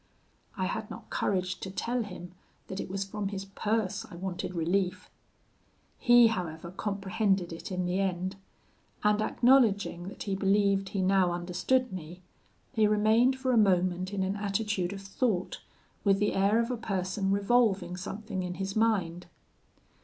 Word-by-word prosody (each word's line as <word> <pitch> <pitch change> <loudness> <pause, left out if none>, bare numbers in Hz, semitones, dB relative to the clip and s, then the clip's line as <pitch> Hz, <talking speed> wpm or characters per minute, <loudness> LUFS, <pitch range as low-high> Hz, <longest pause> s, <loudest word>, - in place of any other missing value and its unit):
I 185 - 0
had 215 +3 -3
not - - -10
courage 185 -1 -1
to 190 - -5
tell 240 +6 -2
him 180 -4 -8 0.4
that 190 - -5
it - - -5
was 195 +1 -2
from 200 +1 -4
his 195 -1 -5
purse 210 +1 -1
I - - -10
wanted 180 0 -4
relief. 180 +3 -1 0.9
He, 240 -1 +7
however, 170 -6 -2
comprehended 195 -2 -1
it 165 - -8
in 180 -1 -1
the 180 +2 0
end; 185 0 -1 0.7
and 210 0 +3
acknowledging 215 -7 +3
that 195 - -7
he 200 - -2
believed 195 0 +2
he 195 -1 -1
now 190 -1 +3
understood 180 +8 0
me, 175 +1 -8 0.5
he 220 -2 +4
remained 220 +5 +3
for 260 -1 0
a 245 - +3
moment 185 -2 +2
in 200 -2 -1
an 190 +1 -1
attitude 200 -2 -1
of 195 -1 -7
thought, 195 -2 -1 0.4
with 195 -1 +4
the 205 +1 +1
air 200 +3 +3
of 235 +2 0
a 245 - -2
person 195 -2 -2
revolving 200 -3 +2
something 195 +2 -5
in 180 -1 -4
his 195 +2 -4
mind. 190 -6 +1
195 Hz, 160 wpm, -29 LUFS, 185-215 Hz, 0.9 s, He